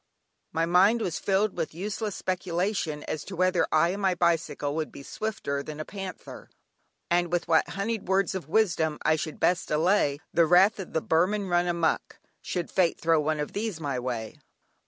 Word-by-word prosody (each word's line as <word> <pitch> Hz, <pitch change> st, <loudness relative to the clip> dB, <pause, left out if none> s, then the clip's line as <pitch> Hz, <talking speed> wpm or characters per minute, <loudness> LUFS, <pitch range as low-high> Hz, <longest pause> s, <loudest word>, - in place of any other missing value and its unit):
My 165 Hz, +1 st, +1 dB
mind 190 Hz, +7 st, +4 dB
was 185 Hz, -7 st, -2 dB
filled 200 Hz, +1 st, +1 dB
with 160 Hz, -, -3 dB
useless 210 Hz, +3 st, -3 dB
speculation 180 Hz, -3 st, -2 dB
as 150 Hz, -, -4 dB
to 195 Hz, -, -7 dB
whether 185 Hz, +1 st, +2 dB
I 155 Hz, +2 st, +4 dB
and 195 Hz, +3 st, -3 dB
my 190 Hz, -2 st, +2 dB
bicycle 165 Hz, -4 st, 0 dB
would 155 Hz, 0 st, -3 dB
be 140 Hz, -, -10 dB
swifter 140 Hz, -8 st, -3 dB
than 150 Hz, +1 st, -8 dB
a 155 Hz, -, -4 dB
panther, 195 Hz, -2 st, -8 dB, 0.6 s
and 175 Hz, 0 st, +2 dB
with 175 Hz, -1 st, 0 dB
what 160 Hz, -, +3 dB
"honeyed 210 Hz, +1 st, -3 dB
words 190 Hz, 0 st, +2 dB
of 180 Hz, -6 st, -6 dB
wisdom" 165 Hz, -6 st, +2 dB
I 155 Hz, -, +4 dB
should 155 Hz, 0 st, -5 dB
best 180 Hz, -1 st, +1 dB
allay 150 Hz, -2 st, +2 dB
the 170 Hz, -1 st, +4 dB
wrath 190 Hz, +6 st, +5 dB
of 190 Hz, -, -7 dB
the 160 Hz, -, +1 dB
"Burman 190 Hz, +4 st, +1 dB
run 175 Hz, 0 st, +2 dB
amuck," 170 Hz, -2 st, 0 dB, 0.2 s
should 175 Hz, -2 st, -4 dB
fate 180 Hz, -3 st, +2 dB
throw 165 Hz, -1 st, +3 dB
one 155 Hz, 0 st, 0 dB
of 150 Hz, -, -4 dB
these 210 Hz, -3 st, -2 dB
in 160 Hz, -, -10 dB
my 140 Hz, -3 st, -1 dB
way. 120 Hz, -3 st, -4 dB
175 Hz, 190 wpm, -27 LUFS, 155-195 Hz, 0.6 s, wrath